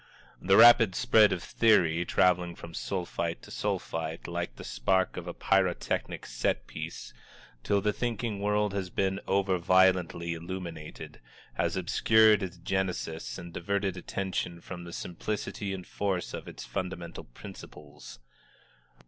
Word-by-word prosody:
The 95 +1 +4
rapid 115 -4 +8
spread 115 -5 +5
of 90 - -1
the - - -9
theory, 85 -7 +3
traveling 90 0 +2
from 85 - -10
Sulphite 85 -3 -3
to - - -12
Sulphite, 80 0 -3
like 85 -7 -4
the - - -10
spark 95 +11 0
of - - -6
a - - -4
pyrotechnic 95 -2 0
set - - -1
piece, - - -7 0.5
till 100 +8 +1
the 105 +1 +1
thinking 115 -3 -2
world 105 0 +1
has 95 -2 -3
been 95 +1 0
over 95 -1 +1
violently 90 -2 +3
illuminated, 85 -2 -7 0.3
has - - -1
obscured 110 -1 +4
its 90 -2 -5
genesis 85 -8 -3
and 85 -1 -9
diverted 100 +1 -1
attention 90 -1 -3
from 85 0 -8
the 85 - -8
simplicity 100 +3 -4
and 95 -2 -5
force 95 -4 -2
of - - -6
its - - -8
fundamental 90 -2 -5
principles. 75 +4 -12
90 Hz, 140 wpm, -29 LUFS, 85-100 Hz, 0.5 s, rapid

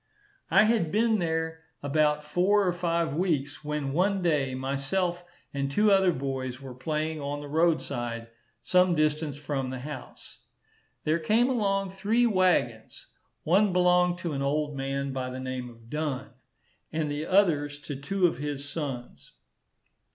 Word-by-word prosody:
I 195 - +6
had 215 -8 +2
been 220 0 +3
there 160 -1 -2 0.2
about 150 +1 +2
four 185 +7 +2
or 180 - +2
five 170 -3 0
weeks, 150 -4 -1
when 150 -2 -2
one 190 +3 +1
day 145 -6 +1
myself 140 +7 -1 0.3
and 140 -1 -1
two 210 +7 +4
other 195 -2 +5
boys 130 -3 -3
were 135 -2 -8
playing 155 +3 -2
on 145 +1 -3
the 145 - -7
road 160 +2 +2
side, 115 -3 -4 0.3
some 180 -1 +4
distance 155 -1 0
from 140 -3 -3
the 130 -1 -5
house. 145 -1 -9 0.6
There 155 +2 +1
came 220 +10 +3
along 195 -5 0
three 210 +5 +2
waggons. 180 - +1 0.3
One 190 +4 +3
belonged 180 0 +4
to 170 -3 -2
an 135 - -2
old 145 +1 0
man 135 0 -2
by 130 -1 -3
the 130 0 -6
name 130 -1 -4
of 115 -1 -16
Dunn, 150 -1 -3 0.6
and 155 -2 -1
the 150 +2 -3
others 150 -7 +3
to 145 - -6
two 180 +8 0
of 165 -7 +1
his 145 -1 -4
sons. 135 -6 -6
150 Hz, 155 wpm, -28 LUFS, 140-180 Hz, 0.6 s, I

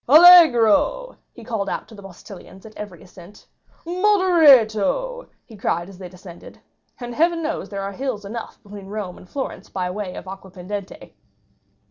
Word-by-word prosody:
"Allegro!" 345 - +6 0.2
he 235 - -14
called 220 -4 -3
out - - -5
to 225 - -16
the 205 - -12
postilions 195 0 -13
at 220 - -13
every 200 -5 -9
ascent. 185 +2 -16 0.4
"Moderato!" 360 - +3 0.2
he 225 - -14
cried 175 -3 -2
as 190 -2 -14
they 185 -2 -9
descended. 180 -1 -14 0.4
And 240 -1 -7
heaven 335 +3 +1
knows 320 +1 -4
there 200 -1 -5
are 195 - -4
hills 235 -2 -5
enough 225 +3 -7
between 200 -2 -11
Rome 200 -3 -6
and 180 - -17
Florence 270 -8 -6
by 180 -1 -3
the - - -5
way 195 -2 -6
of - - -9
Aquapendente! 190 +1 -9
210 Hz, 160 wpm, -21 LUFS, 195-300 Hz, 0.4 s, Allegro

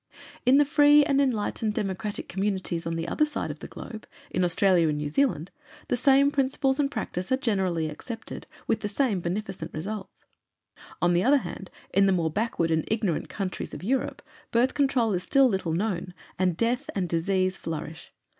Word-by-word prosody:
In 260 +2 +7
the 290 - +5
free 290 0 +6
and 280 -1 +3
enlightened 220 -4 0
Democratic 205 -1 -3
communities 190 -3 -2
on 165 - -2
the 165 0 -3
other 305 - +1
side 300 -1 -2
of - - -9
the - - -8
globe, 220 -3 -9 0.2
in 185 - +1
Australia 175 -1 +3
and 150 - -1
New 150 0 -3
Zealand, 180 - 0 0.4
the - - +2
same 275 +3 +4
principles 270 0 +1
and 280 -1 +2
practice 205 -7 -4
are 260 - +4
generally 190 -10 0
accepted, 225 +9 -7 0.2
with 225 - +1
the 210 - -3
same 210 -2 0
beneficent 190 +3 -4
results. 195 +5 -6 0.8
On 175 0 +4
the 175 +1 +3
other 275 +6 +5
hand, 195 -7 -6 0.2
in 195 +1 +5
the 195 - +4
more 165 -3 0
backward 175 -4 0
and 160 -1 +2
ignorant 210 -7 -1
countries 195 -2 -4
of - - -9
Europe, 260 +7 -1 0.3
Birth 240 +3 +2
Control 260 -6 +2
is 180 - 0
still 270 +8 +4
little 190 -7 -1
known, 180 -1 -2 0.2
and 180 -3 +1
death 245 +6 0
and 190 -3 0
disease 185 +3 0
flourish. 160 -2 -6
200 Hz, 185 wpm, -27 LUFS, 175-255 Hz, 0.8 s, In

